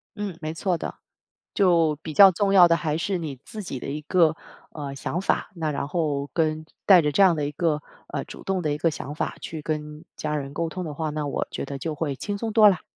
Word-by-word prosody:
嗯， 205 -5 -5
没 155 0 -3
错 175 +2 0
的。 - - -5 0.6
就 170 -6 +3
比 155 - -6
较 195 +2 +9
重 195 +3 0
要 185 -3 +8
的 165 - +4
还 155 -2 -1
是 185 +1 -1
你 150 -5 -5
自 215 - -7
己 135 -8 -5
的 - - -7
一 150 +2 -4
个， 160 0 +3 0.4
呃， 140 -3 -6
想 175 +6 -3
法， - - 0
那 160 -4 -2
然 140 0 -3
后 150 -4 -1
跟 155 -1 0 0.2
带 190 -3 +9
着 150 - +1
这 200 - +2
样 180 -4 +6
的 150 -2 -1
一 145 - -3
个， 150 0 0 0.3
呃， - - -4
主 - - -11
动 195 -1 -1
的 150 - 0
一 - - -3
个 165 - +3
想 145 -2 -6
法， 155 - -3
去 160 -2 -6
跟 150 0 -4
家 150 0 -2
人 140 -2 -4
沟 165 +3 -1
通 180 +3 -5
的 150 -3 -6
话， 160 -2 -2
那 150 -1 -3
我 140 - -2
觉 - - -4
得 140 0 -5
就 155 +3 -3
会 145 -2 -2
轻 205 +9 -4
松 225 0 -2
多 215 -1 +7
啦。 185 - -1
160 Hz, 270 characters per minute, -25 LUFS, 150-180 Hz, 0.6 s, 较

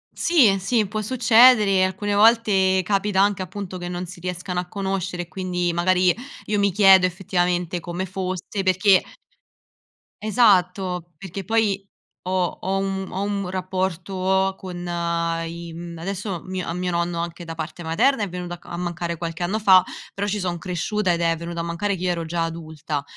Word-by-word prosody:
Sì, 245 - +4
sì, 215 +3 +1
può 215 +2 -3
succedere. 220 -4 +5
Alcune 190 +2 -1
volte 205 -3 +4
capita 200 0 0
anche, 200 -1 +2
appunto, 185 0 -6
che 175 - -5
non 180 0 -4
si 175 0 -10
riescano 180 +1 -4
a 180 - -4
conoscere 190 -2 -3
e - - -15
quindi 180 -1 -2
magari 180 +1 +3 0.3
io 210 0 0
mi 200 -1 +3
chiedo 190 -1 +6
effettivamente 180 -1 -1
come 175 +2 -4
fosse, 185 +1 -4
perché 185 +1 +4 1.2
Esatto, 185 -5 +2
perché 195 +2 -7
poi 205 -1 0 0.4
ho 185 - -3 0.3
ho 190 +1 -1
un 195 -1 -2
ho 190 - -3
un 200 -2 -2
rapporto 190 +1 -1
con 185 -2 -7 0.7
i 170 0 -7
mhmm, 170 0 -8
adesso 190 +1 -4
mio 185 -1 -4
a 165 - -2
mio 180 0 -1
anche 170 0 -3
da 165 -1 -6
parte 160 +2 -6
materna 210 +10 +2
è 200 - -3
venuto 175 0 -6
a 170 - -8
mancare 175 -1 -3
qualche 165 +1 -4
anno 200 +5 -1
fa, 190 -4 +6 0.3
però 200 - -2
ci 205 +1 -1
son 180 -2 -2
cresciuta 185 +3 -1
ed 170 - 0
è 165 -1 +2
venuto 170 +1 -6
a - - -1
mancare 170 +4 -2
che 180 - -6
io 180 - +1
ero 170 -1 -3
già 165 +1 -1
adulta. 160 -3 -5
185 Hz, 170 wpm, -23 LUFS, 175-195 Hz, 1.2 s, chiedo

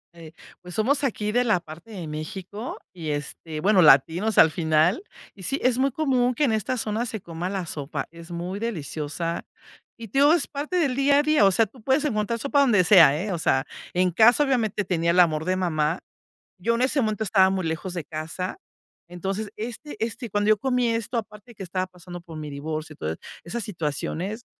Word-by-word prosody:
Eh, 165 -2 -11 0.3
pues, 180 -1 -9
somos 275 +7 +1
aquí 210 -5 -1
de 245 +2 +2
la 215 -7 +2
parte 165 +6 -12
de 185 -7 -7
México 185 +9 -6 0.2
y, 165 -4 -6
este, 150 +2 -5
bueno, 195 -1 +4
latinos 165 +9 +4
al 160 - +7
final. 160 - +2 0.3
Y 195 - -15
sí, 275 - -1
es 255 0 +2
muy 275 0 +2
común 255 -4 +1
que 300 - 0
en 260 - +3
esta 220 +4 -1
zona 225 +1 -2
se 220 -1 -4
coma 170 0 -5
la 195 -2 -3
sopa. 145 -3 -5
Es 170 +1 -12
muy 180 +4 -4
deliciosa 165 -5 -3 0.5
y 230 - -8
te 270 - 0
digo, 290 +3 +6
es 335 -4 +1
parte 300 +5 -3
del 280 -7 +1
día 280 +1 +4
a 290 - +3
día, 305 -8 +4
o 195 - +5
sea, 225 +4 +3
tú 255 - -18
puedes 270 +5 +2
encontrar 220 -2 -1
sopa 280 +4 +2
donde 215 -9 +4
sea, 165 -6 +6
¿eh?, 210 - -3
o 175 - -1
sea, 135 -4 +2 0.3
en 180 0 +2
casa, 235 - +5
obviamente, 225 -7 0
tenía 170 -2 +1
el 180 - +3
amor 160 -3 +3
de 185 +1 +1
mamá. 165 -2 0 0.6
Yo 230 +6 +1
en 240 - 0
ese 270 +2 +2
momento 215 -2 -1
estaba 190 -1 +4
muy 190 -3 -1
lejos 170 +3 -3
de 170 -4 -4
casa. 165 - -5 0.5
Entonces, 195 +4 -4
este 240 +7 -6
este, 230 0 -6
cuando 205 +1 0
yo 215 - +4
comí 250 0 +1
esto, 230 +1 -2
aparte 210 +2 -8
de - - -22
que - - -7
estaba 185 +1 -2
pasando 180 -1 -10
por 165 -2 -10
mi 150 -1 -6
divorcio 155 +2 -5
y - - -21
todas 80 - -4 0.3
esas 220 +7 -4
situaciones, 180 - -4
195 Hz, 210 wpm, -25 LUFS, 165-235 Hz, 0.6 s, al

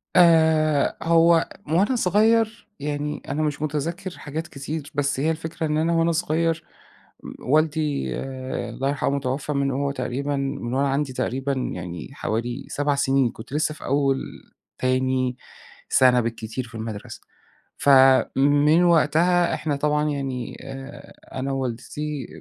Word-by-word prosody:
آآ، 160 -3 +4
هو 165 0 +4 0.2
وأنا 190 - +2
صغير 225 +2 +2
يعني 145 +1 -3
أنا 145 +3 -1
مش 150 -1 -2
متذكر 165 +5 -3
حاجات 160 +3 -5
كتير، 145 +2 -6
بس 140 -1 0
هي 155 +4 +2
الفكرة 160 0 -4
إن 150 0 0
أنا 165 +2 +1
وأنا 165 0 +2
صغير 165 0 0 0.6
م - - -7 0.2
والدي 155 -1 +1 0.6
الله 135 +1 -2
يرحمه، 140 0 0
توفى 135 +2 -2
من 140 -1 0
وهو 140 +1 -1
تقريبًا 140 +1 -2
من 135 -3 -3
وأنا 140 +1 +1
عندي 135 -1 -1
تقريبًا 130 +2 -1
يعني 90 - -5
حوالي 120 -1 -3
7 145 0 0
سنين. 135 -2 +2
كُنت 110 +4 -11
لسه 155 +1 0
في 155 - -11
أول، 135 -1 +2 0.6
تاني 130 0 0 0.5
سنة 125 -1 +5
بالكتير 115 +2 -4
في 115 - -13
المدرسة. 110 -2 -6 0.6
فَمن 140 +4 +5
وقتها 170 +1 +3
إحنا 150 -3 -1
طبعًا 150 +1 +1
يعني 135 -3 -4
آآ، 135 +1 -10 0.2
أنا 135 +1 -2
ووالدتي 135 +2 -4
145 Hz, 135 wpm, -23 LUFS, 135-160 Hz, 0.6 s, سنة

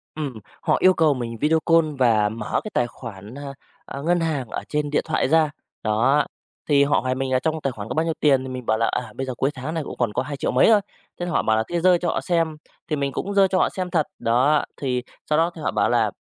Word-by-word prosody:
Ừm, 150 -4 -3 0.3
họ - - +2
yêu 185 0 +6
cầu 160 -4 +3
mình 115 -3 -5
video 160 +2 +3
call 165 -1 +5
và 110 -4 +4
mở 110 0 -2
cái 215 - -6
tài 120 - +1
khoản, 110 -2 -10
a, 140 -1 -7 0.3
a, 140 - -7
ngân 175 +4 +2
hàng 155 -6 -1
ở - - -4
trên 150 -1 -1
điện 145 - +1
thoại 160 - 0
ra, 160 -1 +4 0.3
đó. 115 +7 +3 0.4
Thì 140 -1 +5
họ 140 - +2
hỏi 130 0 -1
mình 130 0 -2
là 130 - +3
"Trong 160 +2 -1
tài 135 - -1
khoản 105 -3 -7
có - - -2
bao 160 +1 +1
nhiêu 165 - 0
tiền?", 135 -3 +3
thì 130 - -6
mình 130 -1 -6
bảo 110 - +2
là 115 - +2
"À, 110 -4 -3
bây 135 - -3
giờ 130 -1 -4
cuối 135 +4 0
tháng 145 +4 -5
nên 160 -2 -2
cũng - - -7
còn 120 -4 0
có 125 - 0
hai 140 +1 -5
triệu - - -1
mấy 125 - +5
thôi". 215 -2 +6 0.4
Thế 175 - -2
là 175 - -3
họ - - +2
bảo 110 0 +2
là 110 - +1
thế 170 -1 -1
giơ 180 -1 +5
cho 175 - -3
họ - - -1
xem, 165 -3 0 0.3
thì 155 - 0
mình 140 -1 -1
cũng 200 +9 -3
giơ 195 -1 +5
cho 185 0 0
họ - - +3
xem 185 -1 -4
thật, 160 -4 +1
đó. 130 +6 +3
Thì 125 -3 -2 0.3
sau 150 - +3
đó 165 +2 +2
thì 160 - -9
họ - - -1
bảo - - +1
là - - +2
145 Hz, 285 wpm, -23 LUFS, 125-160 Hz, 0.4 s, yêu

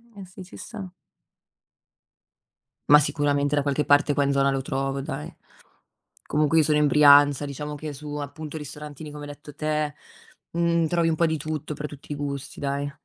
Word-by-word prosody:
Eh 200 -1 -9
sì, 185 +1 -11
ci 180 - -13
sta. 200 -6 -8 2.0
Ma 150 0 +9
sicuramente 145 -1 0
da 145 - +2
qualche 145 +1 0
parte 145 0 +4
qua 145 - +2
in 140 - +1
zona 140 0 +3
lo 135 0 -1
trovo 135 0 -2
dai. 75 - -6 0.9
Comunque 155 +1 +2
io 160 - +6
sono 150 0 +2
in 150 - +4
Brianza, 145 -1 +6
diciamo 150 +1 -5
che 150 0 -6
su 145 +1 -7
appunto 150 +2 -6
ristorantini 150 0 -8
come 145 0 -8
hai 145 - -7
detto 145 0 -12
te, 150 0 -1 0.6
mhmm, 170 -1 +1
trovi 170 +1 +1
un 160 - +1
po' 165 +1 +2
di 160 - -1
tutto 150 0 -4
per 150 - -5
tutti 145 0 -12
i - - -4
gusti, 140 -1 -5
dai. 140 0 -2
145 Hz, 185 wpm, -25 LUFS, 140-155 Hz, 2.0 s, Ma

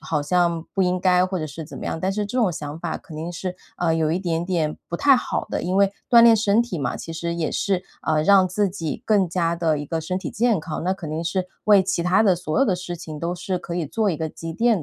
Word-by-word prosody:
好 150 -2 -1
像 170 +1 +1
不 195 - +2
应 180 0 +1
该 180 0 +4
或 185 0 -2
者 155 - -3
是 155 +2 -8
怎 155 - -10
么 - - -7
样。 - - -2
但 190 +2 0
是 210 0 -2
这 230 +5 -5
种 220 -6 +3
想 150 -1 -6
法 170 -1 -3
肯 155 - -12
定 165 +3 -5
是， 180 +1 -5 0.2
啊， 170 -2 +1
有 160 -1 +1
一 175 - 0
点 170 -3 -1
点 165 -4 -1
不 170 - -3
太 275 +4 +5
好 - - -2
的， - - -2
因 180 +2 -1
为 200 0 +4 0.2
锻 235 -1 +8
炼 230 -1 +7
身 210 +1 +3
体 235 -7 -2
嘛， 135 -4 -2
其 165 - -7
实 170 +1 -3
也 165 -2 -1
是， 190 -2 -1 0.2
啊， 155 -1 +1
让 190 +2 +5
自 200 +3 0
己 170 +1 -5
更 205 -4 +3
加 170 -1 0
地 160 -3 +1
一 145 - -5
个 165 +2 -2
身 180 +4 -2
体 190 - -5
健 230 -3 +2
康， 160 0 -5
那 185 - +2
肯 175 -5 -6
定 160 +2 -3
是 185 +2 -1 0.2
为 205 -2 +6
其 185 -2 -1
它 180 +5 +3
的 190 -3 +5
所 155 +2 -2
有 270 - +5
的 185 - +2
事 175 -1 -6
情 160 -3 -8
都 170 +1 -2
是 180 +1 -3
可 175 -1 -6
以 170 -4 -1
做 215 +5 0
一 160 - -2
个 160 +1 -3
积 165 +1 -7
淀 225 -1 +2
180 Hz, 305 characters per minute, -23 LUFS, 165-195 Hz, 0.2 s, 锻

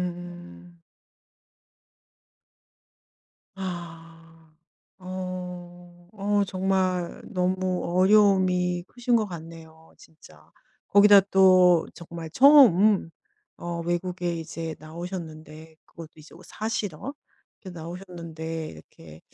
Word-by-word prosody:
음. 90 - -12 2.7
아. 165 -3 -10 0.4
어 180 -1 -8
어 205 +1 +1
정말 185 -2 -1
너무 185 -1 -1 0.2
어려움이 185 -3 +3
크신 245 0 -1
거 215 - 0
같네요 160 -2 -12
진짜. 160 0 -19 0.4
거기다 205 0 +7
또 185 -3 +5
정말 170 -1 -9
처음 215 - +6 0.5
어 170 -1 -5
외국에 175 0 -2
이제 165 0 -6
나오셨는데 160 -1 -9
그것도 165 -2 -12
이제 155 -1 -16
어 - - -15
사시러 215 - -5 0.5
이렇게 185 -4 -10
나오셨는데 165 -2 -7
이렇게 80 0 -15
175 Hz, 185 characters per minute, -25 LUFS, 165-185 Hz, 2.7 s, 거기다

